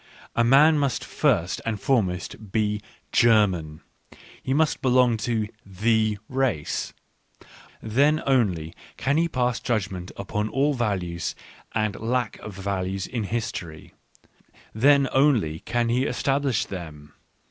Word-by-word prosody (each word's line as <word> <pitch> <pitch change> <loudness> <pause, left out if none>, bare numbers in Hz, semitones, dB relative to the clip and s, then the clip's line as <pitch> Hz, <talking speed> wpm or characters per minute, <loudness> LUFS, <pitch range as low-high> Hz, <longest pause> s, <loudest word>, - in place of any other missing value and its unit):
A 115 - +3
man 145 +6 +6
must 140 -3 -1
first 85 +2 0
and 110 -2 -2
foremost 100 -3 -1
be 105 -1 0 0.2
" - - -39
Ger 115 -3 +5
man," 80 -5 -5 0.6
he - - -4
must 155 +3 +2
belong 125 -2 +4
to 110 -1 -1
" - - -37
the 110 +2 +1
race 125 - -1 0.5
"; - - -22
then 140 +8 +2
only 95 - +1 0.2
can 140 +4 +1
he 170 +1 +3
pass 125 -5 0
judgment 95 -6 -2
upon 105 +2 -2
all 140 +5 +1
values 95 - -2 0.4
and 110 -2 0
lack 120 0 -1
of 105 -3 -9
values 95 -1 -3
in 115 -4 -3
history 100 -8 -5 0.4
— - - -33 0.3
then 140 +4 +4
only 120 - +2
can 120 -1 -1
he 125 +3 +1
establish 135 -3 0
them. 75 -5 -9
110 Hz, 135 wpm, -25 LUFS, 95-130 Hz, 0.6 s, man